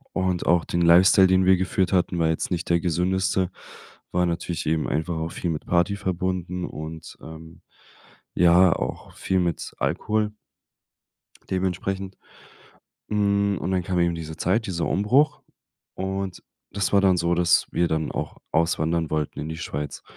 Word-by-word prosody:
Und 95 -2 0
auch 85 0 +3
den 85 - -1
Lifestyle, 95 +3 +6
den 95 0 +3
wir 95 0 +5
geführt 95 0 0
hatten, 90 -1 +1
war 80 -1 +2
jetzt 80 - -2
nicht 90 -1 -2
der 85 0 +3
gesündeste, 90 +2 0 0.6
war 90 0 +1
natürlich 85 -1 -3
eben 80 0 0
einfach 80 +3 -2
auch 80 +1 -3
viel 85 - -3
mit 80 -2 -4
Party 85 +3 +1
verbunden, 90 -2 -3
und, 80 +1 -8
ähm, 80 +1 -11 0.7
ja, 90 0 +5
auch - - -5
viel 95 - 0
mit 85 -3 -2
Alkohol 105 0 0 1.2
dementsprechend. 95 +1 -2 0.9
Hm, 100 -1 +1
und 90 - -3
dann 90 -1 0
kam 90 0 -1
eben 85 -1 +2
diese 80 -1 -7
Zeit, 105 +7 0
dieser 85 -3 -2
Umbruch. 140 +8 +2 0.5
Und 95 -1 -4 0.3
das 100 0 -2
war 100 - +5
dann 95 -2 +4
so, 85 0 +1
dass 85 0 +3
wir 85 0 +1
dann 80 -1 -1
auch - - -5
auswandern 80 0 +1
wollten 75 -1 -2
in 80 - -5
die 80 - -5
Schweiz. 75 -4 -5
90 Hz, 160 wpm, -24 LUFS, 85-95 Hz, 1.2 s, Lifestyle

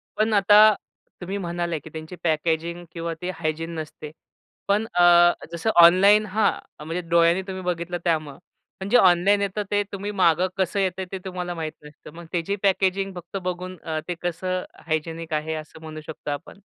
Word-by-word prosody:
पण 215 +1 +1
आता 210 +1 +7 0.5
तुम्ही 190 +3 -4
म्हणाले 170 -3 -3
की 155 - -12
त्यांची 160 +3 -8
पॅकेजिंग 165 +1 -1
किंवा 165 0 -4
ते 180 - -3
हायजीन 165 +1 -3
नसते. 150 -1 -8 0.6
पण 205 +2 +2
अ, 175 - +3 0.5
जसं 170 +6 -2
ऑनलाईन 200 +5 +6
हां 210 +1 +2 0.3
म्हणजे, 165 +3 -3
डोळ्यांनी 170 +1 +4
तुम्ही 190 -1 -5
बघितलं, 175 0 -2
त्यामुळे 155 -5 -1 0.4
पण 190 +1 -5
जे 245 - +6
ऑनलाईन 190 0 +4
येतं, 200 +1 -2
ते 205 0 +3
तुम्ही 200 +1 -4
मागं 180 -2 +3
कसं 190 +1 0
येतंय 190 -1 -1
ते 195 - -3
तुम्हाला 180 -1 -4
माहीत 160 -2 -4
नसतं. 150 0 -13
मग 170 0 -10
त्याची 175 +3 -1
पॅकेजिंग 195 0 +1
फक्त 175 +2 -7
बघून, 180 0 -4
अ, 160 -1 -2
ते 175 - -2
कसं 180 +1 -2 0.2
हायजेनिक 160 +1 -3
आहे 155 +1 -1
असं 155 +1 -16
म्हणू 155 -1 -8
शकतो 155 -1 -7
आपण? 145 +6 -7
175 Hz, 170 wpm, -24 LUFS, 165-195 Hz, 0.6 s, आता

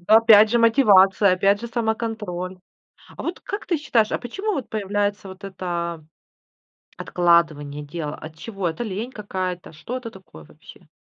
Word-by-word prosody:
Ну, 215 - +7
опять 220 -1 +7
же, 240 - +3
мотивация, 205 -5 +5
опять 200 +3 +2
же, 235 - -5
самоконтроль. 220 -6 -3 0.6
А - - -5
вот 340 - -4
как 405 - -5
ты 340 - 0
считаешь, 230 -7 +1
а - - 0
почему 390 - -4
вот 270 - -4
появляется 205 -1 -2
вот 190 +1 -12
это, 190 -1 -8
а, 170 -2 -3 0.9
откладывание 160 -5 +1
дела? 150 0 -5
От 155 0 -11
чего? 195 0 -4
Это 165 +9 -4
лень 220 +4 -5
какая-то? 185 -6 -5
Что 235 +12 -6
это 230 -3 -8
такое 185 - -14
вообще? - - -17
200 Hz, 165 wpm, -22 LUFS, 175-230 Hz, 0.9 s, Ну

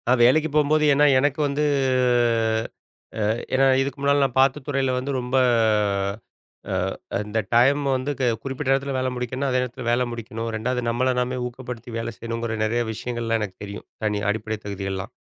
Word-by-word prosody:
நான் 125 0 +3
வேலைக்குப் 150 +4 +3
போம்போது. 150 +1 +3
ஏன்னா, 145 +1 +5
எனக்கு 145 +2 0
வந்து 140 +2 -1 1.6
ஆ, - - -1 0.3
ஏன்னா, 135 +1 +4 0.2
இதுக்கு 135 0 -3
முன்னால 140 0 +3
நான் 135 -3 -1
பார்த்த 135 +2 +2
துறையில 135 -2 0
வந்து 130 +2 -2
ரொம்ப 125 +1 -3 1.4
ஆ, - - 0 0.5
அந்த 105 +1 -4 0.2
டைம் 135 +5 +5
வந்து 130 +3 -2
க - - -1 0.2
குறிப்பிட்ட 135 -1 -3
நேரத்துல 135 0 +1
வேல 130 0 0
முடிக்கணுன. 125 +3 -2
அதே 130 0 +2
நேரத்துல 125 0 -5
வேல 120 +1 +2
முடிக்கணும். 115 0 -5
2வது 125 +3 -1
நம்மள 130 +2 +1
நாமே 125 +1 -1
ஊக்கப்படுத்தி 125 -1 -7
வேல 115 - -3
செய்யணுங்கற 115 -1 -3
நெறைய 115 +2 +1
விஷயங்கள்லாம் 115 0 -2
எனக்குத் 95 -3 -6
தெரியும். 100 0 -8 0.2
தனி 105 -1 0
அடிப்படை 110 +1 -2
தகுதி 100 -1 -5
எல்லாம். 95 0 -5
125 Hz, 165 wpm, -23 LUFS, 115-135 Hz, 1.6 s, ஏன்னா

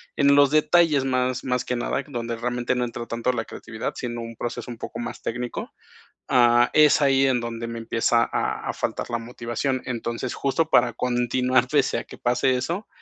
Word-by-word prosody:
en 140 -1 +4
los 140 -1 +6
detalles 155 -1 +4
más 130 -1 0
más 125 -1 -1
que 125 - -1
nada, 120 - -2
donde 120 -4 -4
realmente 120 +1 -1
no 125 0 0
entra 120 0 -6
tanto 120 +2 -1
la 115 -2 -2
creatividad, 110 0 -6
sino 120 -1 -4
un 115 0 -7
proceso 120 +1 -5
un 120 - -8
poco 115 - -7
más 120 - -6
técnico, 125 +1 -4 0.6
ah, 120 -1 +5
es 150 -1 +5
ahí 135 -1 +4
en 130 -2 +2
donde 115 0 -5
me 115 0 -5
empieza 115 +1 +2
a - - -2
a - - -1
faltar - - -3
la 120 - -1
motivación. 120 +2 -3
Entonces, 120 0 -3
justo 155 +4 0
para 120 -4 +4
continuar, 125 +1 +1
pese 140 -1 +1
a - - -6
que - - -12
pase 125 +1 +2
eso, 170 - -3
125 Hz, 195 wpm, -24 LUFS, 120-130 Hz, 0.6 s, los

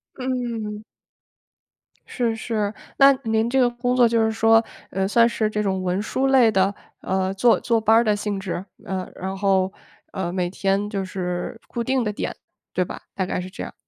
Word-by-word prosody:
嗯。 235 -5 -3 1.3
是 235 -3 0
是， 215 -2 -2 0.2
那 275 0 +8
您 225 +1 +1
这 265 - +2
个 245 -1 +4
工 245 +1 -1
作 245 -2 +6
就 230 -1 +2
是 220 - +2
说， 225 0 +4 0.3
呃， 190 0 0
算 230 +3 +5
是 220 -2 0
这 210 0 -1
种 190 -2 -1
文 185 +2 0
书 260 +5 0
类 260 -4 +5
的， 195 -1 +2 0.3
呃， 190 0 -1
坐 230 +5 +4
坐 230 -2 +1
班 220 +1 +5
儿 230 - +5
的 210 -2 +2
性 205 -1 -3
质？ 190 -1 -4 0.2
呃， 190 -2 -3
然 190 +1 -5
后， 190 -1 +2 0.4
呃， 180 -2 -2
每 180 -1 -1
天 195 +2 0
就 200 -2 -2
是 185 +3 -4
固 235 - -3
定 260 +1 +1
的 210 - -1
点， - - -3 0.4
对 185 - +1
吧？ - - -8
大 190 - -1
概 180 - -2
是 185 - -7
这 - - -9
样。 - - -6
210 Hz, 210 characters per minute, -23 LUFS, 190-235 Hz, 1.3 s, 那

